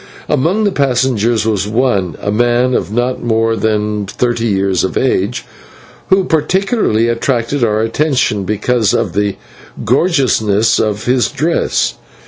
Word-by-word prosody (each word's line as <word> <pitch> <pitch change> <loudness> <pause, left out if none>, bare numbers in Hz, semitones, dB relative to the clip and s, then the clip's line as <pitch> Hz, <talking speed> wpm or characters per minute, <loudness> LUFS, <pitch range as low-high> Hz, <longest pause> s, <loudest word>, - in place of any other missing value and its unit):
Among 180 +11 +1
the 205 - +1
passengers 125 - +1
was 105 -3 0
one, 105 -6 0
a 105 - -2
man 120 +3 +1
of 95 -5 -1
not 120 +3 -1
more 115 -1 +1
than 105 -2 -1
thirty 120 +2 -1
years 95 -3 0
of 95 - -2
age, 125 -3 0 0.6
who 190 0 +4
particularly 160 - +1
attracted 120 +2 -1
our 110 -1 +1
attention 120 -4 0
because 110 +2 0
of - - -1
the 100 -1 0 0.5
gorgeousness 120 - +2
of 105 -1 -1
his 125 -2 +2
dress. 165 +4 0
115 Hz, 130 wpm, -14 LUFS, 105-130 Hz, 0.6 s, who